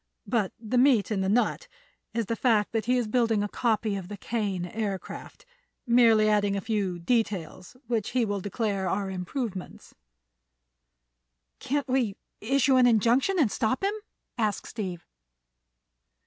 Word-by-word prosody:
But 220 -6 0
the 235 +2 0
meat 245 -6 +4
in 200 -3 0
the 190 - 0
nut 245 - +1 0.4
is 230 -1 -1
the 230 - -2
fact 225 -4 +2
that 225 -2 -1
he 250 +2 +2
is 240 -3 0
building 225 -2 +2
a - - -1
copy 220 -1 0
of 190 -3 -5
the 205 +1 -7
Kane 200 -4 -2
Aircraft, 200 - -5 0.4
merely 230 -3 +5
adding 205 -1 +2
a 200 - -2
few 200 -4 -1
details 185 -1 -2
which 225 -3 -1
he 250 -2 +1
will 205 -1 -2
declare 200 -2 -2
are 195 +1 -1
improvements." 190 +1 -5 1.7
"Can't 285 +1 -2
we 250 -6 0 0.2
issue 265 +3 +3
an 250 -1 +6
injunction 240 - +3
and 270 - +3
stop 255 - -1
him?" 400 +1 +1 0.5
asked 215 -2 0
Steve. 185 -7 -5
220 Hz, 150 wpm, -27 LUFS, 200-245 Hz, 1.7 s, an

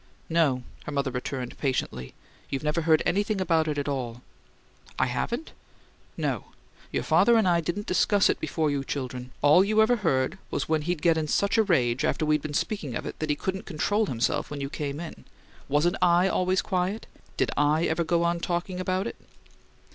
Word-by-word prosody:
"No," 155 -7 +2 0.2
her - - -5
mother 140 -2 -1
returned 125 0 -5
patiently. 65 - -2 0.3
"You've 135 0 -3
never 150 +2 0
heard 160 -1 +3
anything 205 +2 +1
about 165 -3 +2
it 150 -1 -1
at 145 - -2
all." 125 -4 -3 0.7
"I - - +3
haven't?" 235 - -3 0.7
"No. - - -2 0.5
Your - - -1
father 235 -1 +4
and 220 -4 +3
I 170 -1 +3
didn't 175 +6 -3
discuss 200 +2 +3
it - - 0
before 155 0 0
you 140 -1 -1
children. 130 -2 -5
All 150 +6 +7
you 215 +2 +1
ever 230 +3 +5
heard 165 - 0
was - - -2
when 160 -1 +1
he'd 170 0 -2
get 165 -2 +4
in 155 - -2
such 200 +7 +1
a - - +6
rage, 130 - +1
after 155 - +1
we'd 150 -1 +2
been 145 0 -5
speaking 150 - -2
of - - -4
it, - - -6
that 155 - -3
he 150 - +2
couldn't 190 +5 -4
control 205 +7 0
himself 120 -5 -1
when 145 - -5
you 140 0 -4
came 145 -1 -4
in. 170 -1 -8 0.5
Wasn't 155 +6 +2
I 175 +1 +5
always 185 0 +1
quiet? 190 +2 -1 0.3
Did - - +1
I 150 +3 +2
ever 165 +2 +1
go 170 +1 +1
on 170 0 +1
talking 175 +2 -2
about 185 +1 -1
it?" 235 - -5
160 Hz, 195 wpm, -27 LUFS, 140-185 Hz, 0.7 s, All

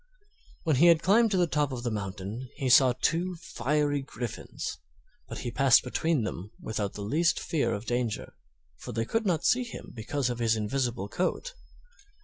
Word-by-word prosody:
When 155 -5 +2
he 170 +6 +6
had 170 -2 +5
climbed 225 +5 +5
to 195 - +1
the 180 - +4
top 150 -4 0
of 120 -2 -5
the 120 - -1
mountain 105 +4 -5
he 130 - -2
saw 130 -1 +7
two 175 +3 0
fiery 145 -2 -1
griffins; 115 - -6 0.5
but - - -7
he 120 - -3
passed 135 -1 +5
between 150 +1 0
them 100 -2 -5
without 105 -2 -3
the 100 - -6
least 160 +11 +2
fear 140 -8 0
of 105 +3 -7
danger, 120 -2 -2 0.4
for - - -8
they 115 +1 -1
could 225 - -1
not 170 -5 0
see 250 +1 +3
him 235 - -9
because 125 +3 -2
of 120 - -5
his 115 -1 +2
invisible 115 0 -1
coat. 185 - -2
130 Hz, 180 wpm, -28 LUFS, 110-165 Hz, 0.5 s, saw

